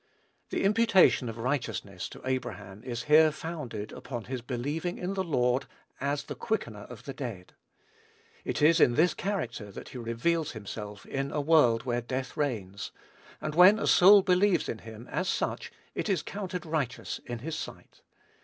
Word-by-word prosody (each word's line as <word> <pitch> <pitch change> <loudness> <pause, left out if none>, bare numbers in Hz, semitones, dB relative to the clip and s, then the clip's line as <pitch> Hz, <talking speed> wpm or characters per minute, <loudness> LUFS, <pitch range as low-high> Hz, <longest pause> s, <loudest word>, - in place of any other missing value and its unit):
The - - -1
imputation 200 - +4
of 115 - -7
righteousness 115 -7 -3
to - - -12
Abraham 105 -6 -4
is 120 -2 -4
here 155 +1 +6
founded 145 -10 -6
upon 120 -4 -6
his 130 0 -5
believing 145 +8 -3
in 180 +2 -3
the 190 -1 -1
Lord 125 -6 +1 0.3
as 140 +1 -1
the - - -6
Quickener 115 - -3
of 125 -3 -10
the 135 - -5
dead. 115 -10 -7 0.9
It - - -2
is 165 +3 +6
in 120 - +5
this 170 +4 +4
character 120 - -3
that - - -9
he 130 - -7
reveals 145 +8 0
himself 105 -2 -7
in 135 0 -3
a 150 - -1
world 140 -7 +4
where 120 -2 -1
death 130 +2 -4
reigns; 100 -9 -2 0.5
and 155 - -4
when 180 +6 +8
a 225 - -2
soul 195 +2 +8
believes 180 -1 +3
in 110 - -4
him, 110 +2 -10
as 185 - -1
such, - - -2 0.2
it - - -3
is 185 -6 +1
counted 185 -3 -5
righteous 150 -6 -2
in 120 -1 -3
his 155 +7 -5
sight. - - -8
135 Hz, 170 wpm, -29 LUFS, 115-170 Hz, 0.9 s, when